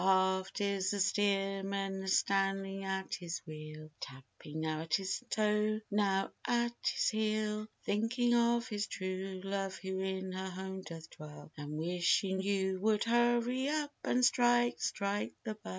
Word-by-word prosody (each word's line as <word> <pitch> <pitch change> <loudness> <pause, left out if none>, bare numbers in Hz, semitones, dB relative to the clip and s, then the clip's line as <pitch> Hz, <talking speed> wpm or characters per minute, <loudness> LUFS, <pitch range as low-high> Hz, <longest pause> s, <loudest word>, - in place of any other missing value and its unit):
Aft 190 0 +2
is 200 -2 +1
the 205 - -1
steersman 195 0 +1
a 190 - -6
standing 195 0 +1
at 190 0 -2
his 175 -1 -3
wheel 155 -1 -8
Tapping 135 +4 -8
now 155 0 -1
at 160 -1 +1
his 190 +4 -2
toe 215 0 +2
now 200 -2 +2 0.2
at 240 0 +2
his - - +2
heel; 215 -1 0 0.2
Thinking 240 +3 +2
of 235 0 +3
his 210 -3 -2
true 185 0 -4
love 195 -1 -2
who 190 0 -4
in 190 0 -2
her 190 +1 -3
home 190 +1 -5
doth 165 -3 -8
dwell 150 0 -11
And 150 0 -6
wishing 180 +3 +2
you 190 -1 0
would 215 0 +3
hurry 240 +3 +2
up 300 -1 0
and 250 0 +3
strike, 240 -1 +4
strike 200 0 -1
the 220 -3 -3
bell. 215 - -11
195 Hz, 150 wpm, -34 LUFS, 185-215 Hz, 0.2 s, strike